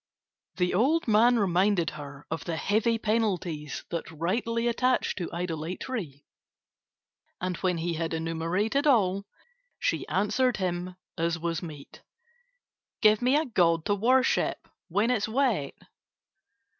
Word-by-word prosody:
The 180 -1 0
old 275 - +2
man 230 +3 +5
reminded 190 -3 +2
her 145 -2 -10
of 160 - -3
the 170 - -2
heavy 225 +6 +1
penalties 190 -9 -1
that 170 -2 -3
rightly 225 +9 -1
attach 250 +2 +1
to 180 - -4
idolatry 170 - -4 1.1
and, 180 0 -2
when 180 -2 0
he 170 +1 -2
had 165 0 -2
enumerated 170 - 0
all, 200 -6 +3 0.5
she - - -1
answered 235 +6 +1
him 180 -1 -3 0.2
as 170 +1 +1
was 170 0 -2
meet: 150 -5 -10 1.0
"Give 215 +1 +5
me 255 +3 +3
a 310 +2 +2
god 170 -8 +2
to 205 - +2
worship 255 +6 +2 0.2
when 220 +4 +1
it 250 - +3
is 210 +1 -3
wet." 225 - 0
190 Hz, 130 wpm, -28 LUFS, 165-230 Hz, 1.1 s, man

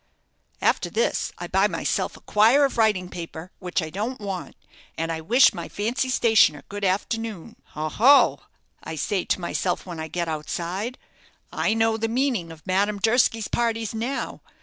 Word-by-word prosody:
After - - +2
this 470 +2 0
I - - -5
buy - - +2
myself - - -2
a - - -18
quire 230 +7 +4
of 270 - -3
writing 210 -5 +2
paper, 170 0 -8
which 180 -1 -2
I 155 - -6
don't 220 +8 -3
want, 195 -3 -5 0.4
and 165 +1 -2
I 160 -1 -3
wish 240 +11 +5
my 170 -3 -6
fancy 235 +5 -1
stationer 220 - +4
good 205 0 -6
afternoon. 205 0 -2 0.2
'Oh, 155 0 -3
oh,' 275 +5 +6 0.4
I - - -6
say 185 +5 -1
to - - 0
myself 180 +1 -2
when 175 -3 -7
I 160 - -4
get 170 +2 -3
outside, 175 +9 -3 0.6
'I 220 - +1
know 225 0 +2
the 225 0 -1
meaning 235 -8 0
of 160 -1 -13
Madame 200 +2 +1
Durski's 225 0 +2
parties 230 -2 -1
now. 235 +5 -3
205 Hz, 170 wpm, -24 LUFS, 175-230 Hz, 0.6 s, oh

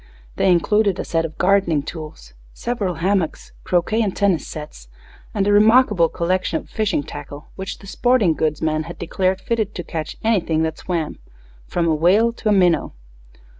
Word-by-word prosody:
They 190 - +3
included 200 +3 +2
a - - -4
set 165 -1 0
of 160 - -8
gardening 180 -6 +2
tools, 155 - -9 0.2
several 210 -7 -2
hammocks, 185 -1 -1
croquet 185 +6 +1
and 205 -4 -1
tennis 195 -6 +1
sets, 150 - -9 0.4
and 200 -2 0
a 205 - +3
remarkable 210 -5 +5
collection 170 -1 -1
of - - -20
fishing 210 -9 0
tackle, 145 +1 -9
which 195 +1 -6
the - - -15
sporting 225 -3 +2
goods 155 -1 -1
man 155 0 0
had 170 - -8
declared 185 +2 -1
fitted 215 0 -2
to 175 - -4
catch 160 -2 -5
anything 175 -8 +1
that 160 -1 -3
swam, 170 -4 -3 0.5
from 170 -1 0
a 160 - +3
whale 195 +9 +3
to 225 - -2
a - - +4
minnow. 180 -4 +3
180 Hz, 170 wpm, -21 LUFS, 160-205 Hz, 0.5 s, remarkable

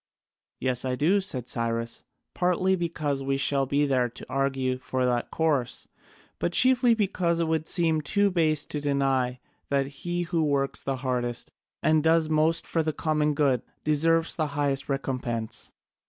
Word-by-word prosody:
"Yes, 125 -1 0
I 130 -1 -1
do," 175 +10 +2
said 130 - -4
Cyrus, 115 0 -2 0.3
"partly 180 +1 +2
because 155 -5 -2
we 135 0 -1
shall 135 -1 0
be 145 +2 +2
there 130 -3 +1
to 120 - -11
argue 135 -1 -1
for 130 0 -1
that 120 -1 0
course, 145 -7 -1 0.5
but 175 - -1
chiefly 250 0 +5
because 180 -5 0
it 165 - +1
would 160 -1 -1
seem 165 -3 +1
too 200 +6 +1
base 155 -4 +1
to 150 - -5
deny 135 -3 0 0.3
that 140 -1 +1 0.2
he 175 0 -1
who 170 -1 -1
works 140 -2 0
the 135 - -2
hardest 120 -2 -2 0.3
and 155 0 +4
does 160 0 +3
most 155 +2 +2
for 165 - 0
the 155 -1 -1
common 150 -2 0
good 135 -5 +2 0.2
deserves 165 +2 +2
the 155 -2 0
highest 140 -2 0
recompense. 125 -4 -3
145 Hz, 160 wpm, -26 LUFS, 130-165 Hz, 0.5 s, chiefly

